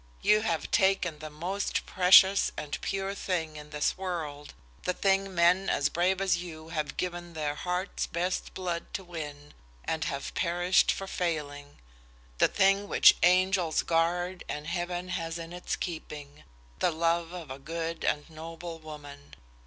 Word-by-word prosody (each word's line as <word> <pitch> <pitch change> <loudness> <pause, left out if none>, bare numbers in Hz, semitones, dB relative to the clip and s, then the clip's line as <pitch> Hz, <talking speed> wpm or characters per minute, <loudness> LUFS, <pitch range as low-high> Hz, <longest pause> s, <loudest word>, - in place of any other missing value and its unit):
You 210 0 +5
have 170 -8 -2
taken 190 -6 +2
the 155 0 -7
most 180 +7 -2
precious 190 +2 +6
and 145 -1 -4
pure 195 0 -2
thing 170 -5 -2
in 150 0 -9
this 150 +4 -1
world, 155 -6 -5 0.3
the 180 - -1
thing 195 0 +1
men 175 +3 +4
as 140 - +2
brave 180 +2 +1
as 190 -2 +2
you 160 -2 -8
have 155 -3 -3
given 175 -1 -4
their 150 -2 -2
heart's 180 +5 -2
best 180 +2 -2
blood 175 -2 -3
to 195 - -4
win 150 -4 -8 0.3
and 160 -1 -1
have 140 0 -4
perished 175 +1 +3
for 195 - -4
failing, 145 -6 -3 0.6
the - - +6
thing 195 +1 +3
which - - +7
angels 180 -1 +3
guard 175 +2 0
and 150 0 -4
Heaven 175 +2 -3
has 165 -2 -3
in 165 0 -7
its 180 - -3
keeping 150 -4 -7 0.3
the - - +3
love 165 +1 0
of 170 -6 -8
a 135 - -7
good 165 +3 -4
and 150 - 0
noble 165 +1 -8
woman. 145 -2 -11
170 Hz, 155 wpm, -29 LUFS, 155-185 Hz, 0.6 s, which